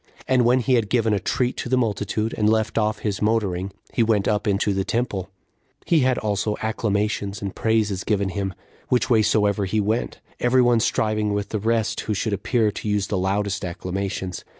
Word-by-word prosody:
And 130 -2 +3
when 125 +2 +4
he 125 +2 +1
had 115 -4 +2
given 115 -2 +2
a 100 - +1
treat 125 +6 -1
to - - -4
the 130 - +2
multitude, 110 -1 -1
and 105 -1 +2
left 110 0 +1
off 105 -1 0
his 100 -2 -1
motoring, 100 -4 0 0.2
he - - +1
went 110 -3 +2
up 105 0 0
into 100 0 +1
the 95 0 0
temple; 100 -5 -2 0.6
he 165 - +3
had 130 -2 +2
also 105 0 -1
acclamations 105 -2 -1
and 100 -2 -5
praises 110 -4 +1
given 100 -2 0
him, 95 -1 -3 0.3
which 125 0 +1
way 110 -2 +5
soever 105 -2 +2
he 110 +3 0
went, 110 +3 -1 0.2
every 125 +1 +4
one 120 -1 +4
striving 110 -2 0
with 100 0 -2
the 110 - -2
rest 110 0 0
who 105 - -2
should 105 +1 -1
appear 105 +2 +1
to 105 - -5
use 105 -1 0
the - - -1
loudest 100 +2 -1
acclamations. 95 0 -4
105 Hz, 195 wpm, -23 LUFS, 100-115 Hz, 0.6 s, way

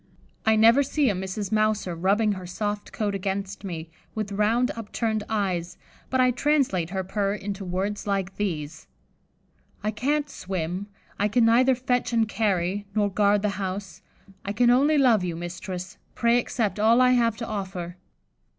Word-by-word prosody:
I 220 - +6
never 230 +5 +6
see 280 -2 +1
a - - -1
Mrs. 190 +2 -4
Mouser 215 -4 +1
rubbing 200 +6 +2
her 185 -3 -5
soft 205 +3 -3
coat 210 -2 -2
against 195 0 -3
me, 165 -4 -6 0.2
with 215 -2 -3
round 220 +5 +2
upturned 220 -1 -2
eyes, 185 -5 -1 0.3
but 260 - 0
I 255 0 +5
translate 250 - +1
her 190 0 -2
purr 200 +1 -1
into 200 -1 -5
words 195 +3 -3
like 195 -1 -1
these: 160 -6 -4 1.0
'I 215 - 0
can't 285 +7 0
swim; 185 - -4 0.3
I 205 - +3
can 225 +2 +3
neither 255 +3 +5
fetch 250 -1 -1
and 225 -1 +3
carry, 200 -2 0
nor 205 -2 +2
guard 205 +1 +3
the 210 - +2
house; 195 0 -5 0.4
I 200 - -3
can 240 +3 +4
only 285 +5 +4
love 240 -8 +4
you, 175 -2 -2
mistress; 175 +1 -6 0.2
pray 235 +1 +3
accept 220 -3 -2
all 225 +3 +5
I 255 0 +5
have 230 -3 +2
to 230 - -4
offer. 190 -5 -5
205 Hz, 165 wpm, -25 LUFS, 190-230 Hz, 1.0 s, I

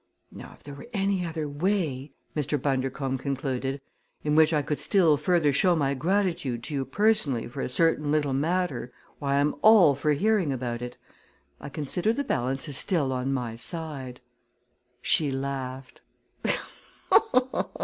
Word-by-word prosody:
"Now - - -11
if - - -21
there 145 - -9
were 145 - -11
any 195 -2 0
other 160 -3 -3
way," 145 -3 -1 0.2
Mr. 150 -1 0
Bundercombe 135 0 -1
concluded, 135 -1 -3 0.4
"in 150 - 0
which 155 +1 +5
I 150 -2 +1
could 150 +1 -2
still 170 -6 +4
further 150 -1 +2
show 175 +5 +3
my 140 -3 +1
gratitude 165 - -1
to 150 - -3
you 135 -2 -1
personally 180 - +1
for 120 - -6
a - - -2
certain 150 +1 +2
little 150 -3 +1
matter, 150 -4 -1 0.3
why 140 -1 0
I'm 145 +1 +2
all 210 -9 +7
for 150 +2 0
hearing 195 -1 +1
about 120 -2 -3
it. 125 0 -7 0.6
I - - -8
consider 165 +9 -1
the 285 - -2
balance 135 - -2
is 140 -3 0
still 150 -9 +1
on 130 +1 -2
my 125 -4 -2
side." 135 -1 -4 0.8
She 150 -3 +4
laughed. 135 -1 -5
145 Hz, 150 wpm, -26 LUFS, 135-165 Hz, 0.8 s, all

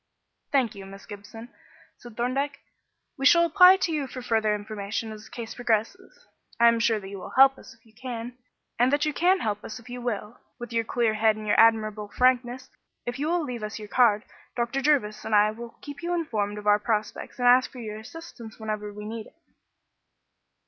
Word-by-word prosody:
"Thank 255 -5 +2
you, 195 -2 -10
Miss 195 0 -12
Gibson," 220 +3 -11 0.4
said 240 -3 -14
Thorndyke. 275 +4 -1 0.6
"We 270 - +4
shall 340 0 +6
apply 365 +3 +7
to 370 -3 -1
you 295 -4 -2
for 255 -1 -8
further 220 -3 +1
information 210 +1 -5
as 215 0 -10
the - - -15
case 230 -2 -7
progresses. 245 - -2 0.3
I 235 0 +7
am 230 0 +1
sure 225 -1 +2
that 195 - -10
you 195 0 -8
will - - -9
help 270 0 +7
us - - -14
if - - -32
you 220 - -23
can, 240 0 -6 0.4
and 245 +2 +4
that 290 +1 +2
you 305 - -1
can 360 +4 +2
help 210 -1 -2
us - - -7
if 235 +1 -14
you 245 0 -6
will, 225 -2 -4 0.2
with 240 0 -8
your 230 0 0
clear 230 -1 +1
head 215 0 +3
and 215 0 -8
your 205 - +2
admirable 215 -2 +3
frankness. 250 +2 +1 0.4
If 240 +2 -4
you 295 - -1
will 345 0 +1
leave 250 -5 -5
us 215 0 -5
your 210 -1 -9
card, 220 -3 +3 0.3
Dr. 240 +3 -1
Jervis 260 -8 +1
and 220 - 0
I 210 +1 +5
will 230 +1 -10
keep 290 +1 -9
you 350 +1 -1
informed 210 -11 -2
of 210 - -8
our 210 0 +4
prospects 215 -1 -3
and 245 -1 +1
ask 250 +1 +5
for - - -13
your 215 -3 -6
assistance 235 -3 -11
whenever 215 -1 -4
we 210 0 -9
need 220 0 -6
it." - - -22
230 Hz, 210 wpm, -26 LUFS, 215-260 Hz, 0.6 s, apply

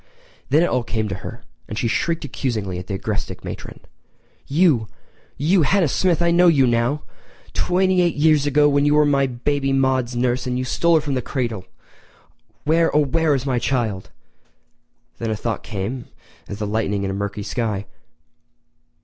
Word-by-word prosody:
Then 150 +5 +4
it - - +1
all 125 - +1
came 110 -1 -2
to - - -3
her, - - -8 0.2
and 105 - -6
she 115 - 0
shrieked 165 +7 -1
accusingly 110 -9 -3
at 90 - -9
the 100 - -3
agrestic 105 +2 -4
matron. - - -8 0.7
"You—you—Hannah 155 - +1
Smith—I 170 +3 +2
know 175 +1 +5
you 145 -6 +5
now! 120 +5 +1 0.5
Twenty 185 0 +2
eight 175 -2 +1
years 150 -1 +3
ago 145 0 +3
you 145 +1 +3
were 150 0 +5
my 140 -2 +2
baby 135 +3 -1
Maude's 130 -2 +1
nurse 125 +1 0
and 125 0 -1
stole 170 +5 +2
her 160 - +4
from 145 -2 -3
the 130 - 0
cradle!! 115 -8 -3 1.0
Where, 165 +2 +3
oh, 150 -1 +4
where 155 +1 +2
is 135 -1 -3
my 130 -3 0
child?" 115 -8 -1 1.1
Then 115 - -2
a 110 - 0
thought 115 +1 -3
came 115 +4 -5 0.4
as 100 - -6
the 105 - -3
lightning 105 -1 -1
in 95 - -2
a - - -3
murky 100 +1 -4
sky. 105 -4 -2
130 Hz, 165 wpm, -21 LUFS, 115-150 Hz, 1.1 s, know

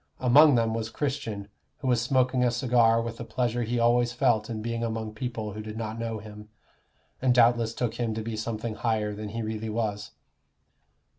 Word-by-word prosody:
Among 140 +3 +6
them 115 -1 +2
was 110 -1 -3
Christian, 115 -7 -3 0.3
who 135 - -5
was 120 -2 +3
smoking 130 0 +2
a 125 - +4
cigar 120 -2 +3
with 115 0 -6
a - - -4
pleasure 120 0 -1
he 120 +1 -1
always 120 +1 +3
felt 120 -3 +1
in 110 -2 -4
being 115 0 -2
among 110 -1 -3
people 110 -2 -4
who 110 - -6
did 110 0 -7
not 110 0 -4
know 115 -1 -3
him, 105 0 -11 0.7
and 125 -1 +3
doubtless 120 -1 +4
took 120 -3 -1
him 115 -2 -1
to 110 - -3
be 115 0 -4
something 110 +1 -3
higher 110 -2 -1
than 105 0 -6
he 115 +2 -4
really 110 0 -4
was. 105 -2 -2
115 Hz, 195 wpm, -27 LUFS, 110-120 Hz, 0.7 s, Among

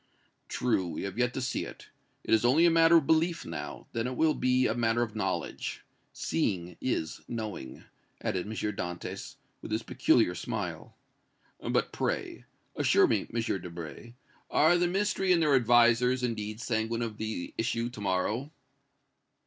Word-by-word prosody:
"True, 115 -7 0
we 85 - -5
have 100 +3 -5
yet 125 0 +2
to 130 - -2
see 130 - -1
it. - - -10 0.3
It - - 0
is 110 - +4
only 140 +8 +5
a 170 - +6
matter 165 0 +6
of 155 - +2
belief 165 +3 +2
now; - - -6
then 115 +1 -1
it 125 - -4
will 160 +3 +3
be 130 -1 +2
a 110 - +2
matter 120 0 +1
of 110 -2 -6
knowledge. 95 -3 -3 0.3
Seeing 90 - -2
is 80 -11 -2
knowing," 110 - -6 0.4
added 95 +1 -2
M. - - -5
Dantès, 95 -5 -4 0.3
with - - -8
his - - -1
peculiar - - +3
smile. - - -5 0.6
"But, - - 0
pray, - - -3 0.3
assure - - +4
me, - - 0
M. 115 - 0 0.2
Debray, 85 +7 -8 0.3
are 160 +3 +5
the 175 0 +2
Ministry 195 0 +1
and 175 - +5
their 150 -3 +3
advisers, 120 0 +4
indeed, 110 -2 -3
sanguine 115 -1 -1
of 110 -2 -5
the 110 -5 -4
issue 115 0 0
to 110 - -9
morrow!" 105 +8 -1
120 Hz, 160 wpm, -29 LUFS, 105-130 Hz, 0.6 s, a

